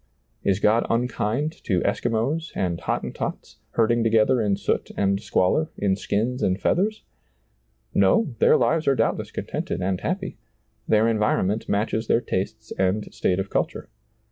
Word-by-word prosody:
Is 95 -1 +2
God 110 +3 +3
unkind 120 +4 0
to 90 -5 +1
Eskimos 125 +8 -1
and 85 -2 -1
Hot - - -1
tentots, - - -5 0.2
herding 115 0 +2
together 115 +2 +3
in 100 -2 +1
soot - - -1
and 100 0 +1
squalor, 110 - +1
in 100 -2 +1
skins 110 +6 -1
and 95 +1 +1
feathers? 215 +5 0 0.9
No; 110 - +3
their - - +5
lives 155 +7 +1
are 135 - +4
doubtless - - 0
contented - - -4
and 95 0 -1
happy; 190 - -3 0.5
their 110 +1 +4
environment 105 -1 0
matches 110 +2 0
their - - +4
tastes 110 +1 -4
and 95 +3 0
state 90 - 0
of 95 0 -3
culture. - - -2
110 Hz, 145 wpm, -24 LUFS, 100-125 Hz, 0.9 s, their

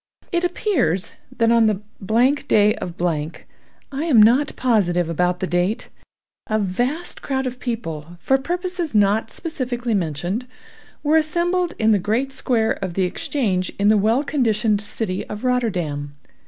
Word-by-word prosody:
It 345 -1 0
appears 325 - 0
that 230 -3 +2
on 230 -1 +5
the—— 215 - +2 0.7
day 210 0 +4
of—— 175 - -6 1.0
(I 280 +2 -3
am 280 -9 +5
not 245 +7 +5
positive 180 -9 +2
about 180 +2 0
the - - +1
date), 180 +4 -1 0.6
a 215 - +1
vast 245 - -2
crowd 265 -1 -2
of 255 0 -4
people, 175 - -5
for 270 +9 +2
purposes 350 - -3
not 210 +2 +3
specifically 250 -7 -3
mentioned, 180 - -2 0.6
were 305 +2 +4
assembled 350 +3 0
in 220 0 +3
the 205 - +4
great 230 +8 -1
square 230 -4 +1
of 180 -3 -4
the 190 - +2
Exchange 185 -1 -1
in 200 +1 +3
the 215 - +5
well 220 +7 +2
conditioned 220 -7 +1
city 205 -2 -3
of 210 +2 -7
Rotterdam. 175 - -1
225 Hz, 145 wpm, -21 LUFS, 185-270 Hz, 1.0 s, on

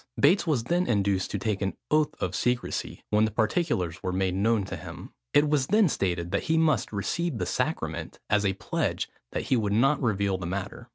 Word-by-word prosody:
Bates 185 -1 +4
was 140 -8 +1
then 175 +8 +1
induced 100 -4 +1
to - - -2
take 105 0 -2
an 95 -1 -1 0.2
oath 155 0 +2
of 90 - -2
secresy; 125 +5 -2
when 105 +1 +4
the - - 0
particulars 110 - 0
were 95 - -2
made 95 0 0
known 105 +2 +2
to 95 - -5
him. - - -9 0.2
It 145 +1 +4
was 145 -3 +1
then 210 0 +4
stated 85 -6 -1
that - - -1
he 160 - +4
must 155 -8 +2
receive 135 - -2
the - - -1
sacrament, - - -2
as 105 -1 +2
a 95 -1 +2
pledge 95 - -2 0.2
that - - -1
he - - +1
would 105 -4 0
not 135 +7 +3
reveal 100 -5 +1
the 85 - -4
matter. 100 +3 -5
110 Hz, 210 wpm, -27 LUFS, 95-145 Hz, 0.2 s, Bates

